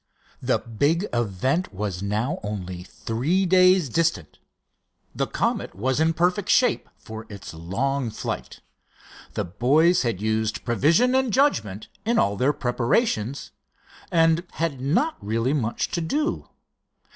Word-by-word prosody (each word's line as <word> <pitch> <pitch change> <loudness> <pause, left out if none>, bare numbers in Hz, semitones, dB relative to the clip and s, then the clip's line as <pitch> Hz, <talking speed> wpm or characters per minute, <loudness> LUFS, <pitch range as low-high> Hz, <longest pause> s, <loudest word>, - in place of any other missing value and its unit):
The - - +2
big 145 - 0
event 120 - 0
was 95 -2 -4
now 110 - -1
only 95 -4 -5
three 130 - -1
days 185 -2 +5
distant. 160 - -1 0.7
The - - -1
Comet - - -2
was 130 +8 0
in 160 +1 +2
perfect 180 +4 +1
shape 255 - +3
for 110 0 -9
its 100 -5 -9
long 115 +11 -2
flight. 110 - -5 0.7
The - - -1
boys 145 - +3
had 115 -7 -1
used 110 0 -1
prevision 160 - +3
and 260 -2 +2
judgment 155 - +1 0.2
in 230 +2 +1
all 100 - +2
their 130 +7 +2
preparations; 125 - -1 0.6
and 165 0 +3
had 155 -6 -2
not 185 - 0
really 115 +5 0
much 120 -6 -1
to 170 - -1
do. 295 - -2
135 Hz, 130 wpm, -24 LUFS, 110-170 Hz, 0.7 s, days